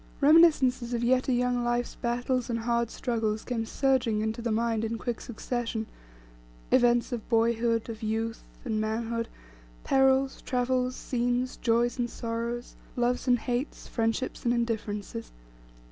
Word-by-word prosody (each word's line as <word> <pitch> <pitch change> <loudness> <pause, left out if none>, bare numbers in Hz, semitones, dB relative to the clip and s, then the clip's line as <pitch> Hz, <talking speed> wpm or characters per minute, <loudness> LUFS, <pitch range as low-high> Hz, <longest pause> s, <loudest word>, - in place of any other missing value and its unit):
Reminiscences 275 -6 +5
of 235 - -1
yet 255 +1 +2
a - - +2
young 245 0 +1
life's 240 0 0
battles 245 +1 -1
and 230 - 0
hard 235 0 0
struggles 225 -3 -1
came 230 -3 -2
surging 255 -6 +1
into 220 +2 -2
the 235 -1 -1
mind 225 0 +1
in 225 +1 -2
quick 240 0 -4
succession: 240 -1 -3 0.9
events 240 +1 +4
of 235 -3 -5
boyhood, 230 0 +2
of 225 -1 -7
youth, 225 +1 -2 0.2
and 220 -3 0
manhood; 230 +1 -2 0.6
perils, 270 0 +3
travels, 255 0 0
scenes, 245 +1 -1
joys, 240 +2 +1
and 240 0 0
sorrows; 235 +1 -4 0.2
loves 245 +1 0
and 245 -1 +5
hates; 245 +4 -3
friendships 225 +2 -1
and 240 0 +2
indifferences. 210 - -3
240 Hz, 140 wpm, -28 LUFS, 230-250 Hz, 0.9 s, Reminiscences